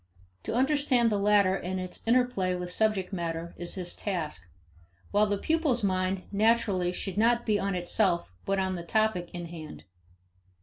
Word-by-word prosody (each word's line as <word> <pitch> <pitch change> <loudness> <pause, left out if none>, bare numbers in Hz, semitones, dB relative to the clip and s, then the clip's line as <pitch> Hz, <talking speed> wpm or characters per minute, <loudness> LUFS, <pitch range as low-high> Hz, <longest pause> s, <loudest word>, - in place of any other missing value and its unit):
To - - -2
understand 260 -3 +3
the 205 - +1
latter 200 -2 +4
in 185 0 -3
its 185 -1 -5
interplay 235 -7 +2
with 180 0 -5
subject 205 -2 0
matter 170 -1 -3
is 175 0 -4
his 180 -2 -5
task, 170 - -3 0.7
while 210 +1 +4
the 205 0 0
pupil's 300 -3 0
mind, 185 -1 0
naturally, 205 -4 +2
should 190 +1 -4
be - - +3
not 235 +1 +2 0.2
on 195 - -1
itself 175 - +1
but 195 - 0
on 190 -1 0
the 175 -2 -5
topic 215 -2 0
in 175 -1 -6
hand. 160 -3 -9
195 Hz, 165 wpm, -28 LUFS, 180-220 Hz, 0.7 s, latter